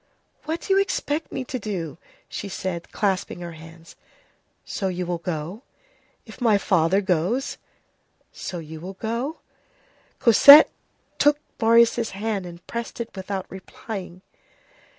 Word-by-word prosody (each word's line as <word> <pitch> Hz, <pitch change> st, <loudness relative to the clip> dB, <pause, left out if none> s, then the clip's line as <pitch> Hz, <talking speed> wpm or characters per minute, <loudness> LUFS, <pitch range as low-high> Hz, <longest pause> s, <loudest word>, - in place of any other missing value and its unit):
"What 320 Hz, +2 st, -3 dB
do 390 Hz, -, 0 dB
you 390 Hz, -, +5 dB
expect 320 Hz, -5 st, -2 dB
me 260 Hz, -, -3 dB
to 255 Hz, 0 st, -4 dB
do?" 175 Hz, -8 st, -5 dB, 0.3 s
she 200 Hz, -, -6 dB
said, 185 Hz, -2 st, -5 dB
clasping 190 Hz, -3 st, -1 dB
her 170 Hz, -1 st, -6 dB
hands. 165 Hz, +1 st, -13 dB, 0.7 s
"So, 195 Hz, -, -3 dB
you 180 Hz, -1 st, -2 dB
will 175 Hz, -1 st, -2 dB
go?" 170 Hz, +4 st, -5 dB, 0.6 s
"If 225 Hz, +2 st, -13 dB
my 225 Hz, -4 st, +4 dB
father 185 Hz, 0 st, +2 dB
goes." 190 Hz, -, -1 dB, 0.7 s
"So, 180 Hz, -, -6 dB
you 160 Hz, -1 st, -8 dB
will 190 Hz, +3 st, -7 dB
go?" 235 Hz, +9 st, -3 dB, 0.8 s
Cosette 280 Hz, +6 st, +9 dB, 0.5 s
took 290 Hz, 0 st, +5 dB, 0.2 s
Marius' 230 Hz, 0 st, +4 dB
hand, 200 Hz, -2 st, -3 dB
and 170 Hz, 0 st, -12 dB
pressed 235 Hz, 0 st, -6 dB
it 235 Hz, -2 st, -6 dB
without 190 Hz, 0 st, -4 dB
replying. 190 Hz, -1 st, -8 dB
195 Hz, 130 wpm, -24 LUFS, 175-235 Hz, 0.8 s, Cosette